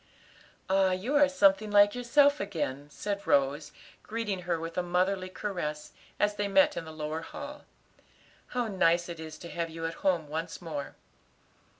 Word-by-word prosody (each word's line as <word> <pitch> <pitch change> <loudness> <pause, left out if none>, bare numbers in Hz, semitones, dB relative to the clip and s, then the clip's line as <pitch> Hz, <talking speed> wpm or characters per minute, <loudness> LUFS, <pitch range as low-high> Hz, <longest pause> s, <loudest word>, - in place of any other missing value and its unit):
"Ah, 190 -1 +3
you 215 +11 -2
are 290 -1 +6
something 210 -5 +3
like 205 0 +6
yourself 285 +4 +4
again," 145 -7 -3
said 200 +6 -4
Rose, 145 +2 +2 0.3
greeting 215 -4 -3
her 170 -1 +1
with 165 +1 -6
a 180 - +1
motherly 185 +2 0
caress, 165 -7 -4 0.3
as 205 0 +2
they 205 - 0
met 290 +8 +4
in 165 - -4
the 160 - -8
lower 155 +1 -4
hall. 290 - -8 0.8
"How 245 -1 -1
nice 175 -4 +2
it 170 -1 -6
is 160 -1 -8
to 170 - -9
have 170 -1 -2
you 165 0 -6
at 165 - -2
home 175 -5 +1
once 160 +3 -4
more." 155 -5 -6
185 Hz, 170 wpm, -29 LUFS, 160-205 Hz, 0.8 s, are